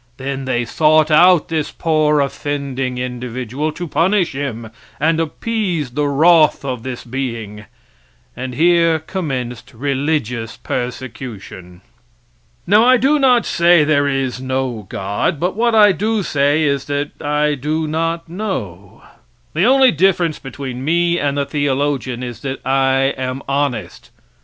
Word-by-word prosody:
Then 135 0 -4
they 120 -2 -1
sought 155 +3 +3
out 175 +1 +5
this 160 -2 -1
poor 155 -2 +1
offending 140 -2 -3
individual, 125 +3 -4
to 175 +2 -6
punish 175 +5 +1
him 120 -5 -5 0.3
and 160 +2 +2
appease 170 - -2
the 145 +3 -1
wroth 155 +1 +4
of 125 -4 -3
this 125 0 -6
being. 115 -5 -5 0.7
And 125 0 -6
here 165 +1 +3
commenced 130 -8 -5
religious 130 -3 -2
persecution. 115 -8 -6 0.8
Now, 210 +4 +5
I 255 +1 +6
do 275 +5 +2
not 250 -3 +4
say 170 -2 +4
there 145 -1 +2
is 135 -3 -2
no 130 -5 -3
God, 100 +9 -2
but 180 +4 -1
what 235 +1 +1
I 210 -2 +7
do 210 +4 -1
say 145 0 +1
is 140 -2 0
that 145 0 -4
I 150 0 +1
do 150 +3 -2
not 165 +2 -2
know. 145 - -6 0.5
The - - +2
only 265 +1 +5
difference 170 -1 +1
between 130 -2 -7
me 170 +3 +1
and 145 -1 -1
the 140 - 0
theologian 140 -3 -1
is 120 -2 -6
that 135 -1 -4
I 135 0 +2
am 130 +1 -4
honest. 140 -3 -2
145 Hz, 140 wpm, -18 LUFS, 130-165 Hz, 0.8 s, I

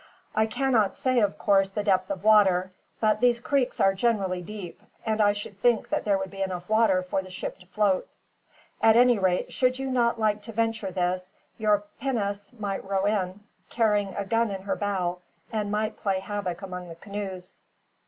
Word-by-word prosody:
I 220 0 +3
cannot 230 -3 +1
say, 255 -1 +1
of 205 -3 +1
course, 195 -2 +3
the 205 +2 -3
depth 190 -2 +2
of 195 -1 -4
water; 190 -4 +5 0.3
but 215 -1 +2
these 245 -1 +4
creeks 265 +1 0
are 195 - +4
generally 195 -4 0
deep, 190 -1 -8 0.2
and 220 -1 +1
I 205 -1 +5
should 205 -1 -8
think 240 -3 +2
that - - -1
there 200 -2 +3
would 190 -1 -5
be 195 -1 -7
enough 180 -2 -3
water 215 -4 +3
for 185 +1 -1
the 185 - -12
ship 180 - -6
to 180 - -18
float. 200 -1 +1 0.7
At 220 0 +6
any 245 -2 +5
rate, 185 -2 0
should 255 0 +2
you 270 0 -3
not 235 -2 +2
like 215 -1 +1
to 225 +2 -9
venture 225 -2 -1
this, 185 0 -2 0.3
your 210 -1 +2 0.2
pinnace 205 -6 -2
might 200 -2 -3
row 195 0 -1
in, 200 -2 -1 0.3
carrying 210 -4 +1
a 200 - -2
gun 230 +2 +1
in 195 -1 -5
her 200 - -1
bow, 185 -3 -1 0.3
and 210 -2 -1
might 215 +1 -1
play 195 -2 0
havoc 195 -2 -4
among 180 -2 -6
the 165 - -8
canoes. 190 -1 -7
205 Hz, 195 wpm, -26 LUFS, 190-220 Hz, 0.7 s, At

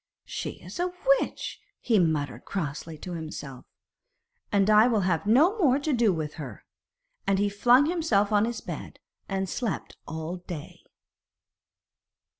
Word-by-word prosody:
'She - - -4
is - - -8
a 360 +1 0 0.3
witch,' - - -5 0.2
he 225 -4 +3
muttered 145 -7 0
crossly 160 -2 -4
to 180 - -8
himself, 150 -5 -7 0.9
'and 200 -1 +3
I 215 +2 +7
will 225 -4 +2
have 180 +1 0
no 320 - +5
more 275 -7 +4
to 290 +1 -1
do 235 -4 +4
with 155 -3 -3
her.' 135 - -8 0.6
And 195 - +3
he 205 +1 +2
flung 245 +7 +5
himself 300 - +1
on 210 0 +4
his 235 -1 -4
bed - - -7 0.3
and 195 -1 -1
slept 220 +3 -3
all 160 +2 -4
day. 175 -4 -8
200 Hz, 145 wpm, -27 LUFS, 160-240 Hz, 0.9 s, I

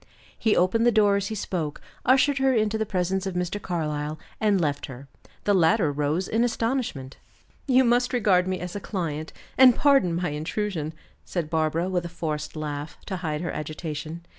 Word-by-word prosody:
'" - - -25
He 220 - +2
opened 185 +6 +3
the - - +6
door 205 -2 +4
as 200 0 -2
he 220 - -4
spoke, 170 -7 -3 0.3
ushered 270 +2 +4
her 265 -1 +3
into 215 -1 +1
the 220 -1 -1
presence 190 0 -1
of 190 - -4
Mr. 180 +3 -2
Carlyle, 155 -4 -3 0.2
and 205 -3 +3
left 145 -4 -1
her. 135 0 -10 0.4
The 205 - +2
latter 175 -2 +3
rose 150 +5 -1
in 225 +2 +1
astonishment. 230 - -2 0.5
"You 260 -1 +5
must 245 0 +2
regard 195 -7 +3
me 185 0 -1
as 180 +1 -6
a - - -2
client, 160 -6 -4 0.3
and 255 -2 +8
pardon 275 - +4
my 175 +1 -1
intrusion," 155 +1 -3 0.3
said 165 -4 -4
Barbara, 160 +2 +1
with 180 -2 -1
a 170 - -5
forced 150 -3 -4
laugh, 150 -1 -5
to 190 - -3
hide 155 -4 -3
her 175 - -2
agitation. 155 +1 -5
180 Hz, 190 wpm, -25 LUFS, 155-215 Hz, 0.5 s, and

